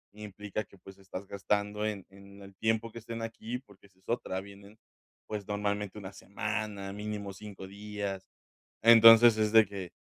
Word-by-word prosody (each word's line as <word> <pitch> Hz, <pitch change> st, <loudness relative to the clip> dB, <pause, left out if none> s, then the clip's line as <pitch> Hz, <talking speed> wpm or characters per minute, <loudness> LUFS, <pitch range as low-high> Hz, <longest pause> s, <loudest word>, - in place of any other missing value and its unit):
Implica 105 Hz, 0 st, -5 dB
que, 100 Hz, -1 st, -20 dB
pues, 95 Hz, +1 st, -14 dB
estás 95 Hz, 0 st, -8 dB
gastando 105 Hz, +1 st, -1 dB
en 100 Hz, -3 st, -4 dB
en 100 Hz, +1 st, -15 dB
el 100 Hz, 0 st, -14 dB
tiempo 110 Hz, +2 st, 0 dB
que 115 Hz, -, -8 dB
estén 115 Hz, 0 st, -6 dB
aquí, 115 Hz, +1 st, -5 dB
porque 100 Hz, -5 st, -20 dB
esa 95 Hz, -, -33 dB
es 95 Hz, -, -32 dB
otra. 95 Hz, -5 st, -2 dB
Vienen, 100 Hz, +2 st, -14 dB, 0.5 s
pues, 105 Hz, -2 st, -5 dB
normalmente 105 Hz, 0 st, -2 dB
una 100 Hz, -1 st, -8 dB
semana, 105 Hz, -1 st, -4 dB
mínimo 105 Hz, -1 st, -5 dB
5 100 Hz, -1 st, -10 dB
días. 100 Hz, -1 st, -5 dB, 0.6 s
Entonces, 115 Hz, 0 st, +9 dB
es 110 Hz, 0 st, +1 dB
de 110 Hz, -1 st, +8 dB
que, 95 Hz, -3 st, -7 dB
105 Hz, 165 wpm, -30 LUFS, 100-110 Hz, 0.6 s, Entonces